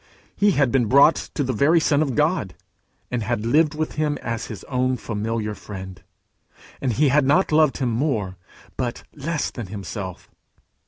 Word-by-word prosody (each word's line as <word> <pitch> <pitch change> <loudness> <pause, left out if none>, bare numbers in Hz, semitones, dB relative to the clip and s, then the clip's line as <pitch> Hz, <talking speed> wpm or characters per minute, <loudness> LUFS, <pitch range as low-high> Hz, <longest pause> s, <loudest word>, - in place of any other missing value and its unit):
He 205 -1 +3
had 140 -6 +2
been 125 -4 +2
brought 140 +6 +6 0.2
to 145 - 0
the 130 -1 -1
very 145 +9 +4
Son 150 -2 +2
of 140 -5 -1
God, 150 - 0 0.6
and 125 -1 -1
had 110 0 -2
lived 150 +5 +3
with 155 0 -2
him 150 -1 0
as 115 -1 -3
his 110 - -8
own 130 -1 0
familiar 110 -1 -3
friend; 95 -4 -9 0.8
and 130 -4 0
he 145 +4 +3
had 150 +3 +4
not 150 +8 +3
loved 155 -2 +4
him 130 -3 0
more, 110 -7 -1 0.4
but 125 -2 -3
less 150 +1 -2
than 120 -5 -7
himself. 95 -1 -7
130 Hz, 170 wpm, -23 LUFS, 110-150 Hz, 0.8 s, brought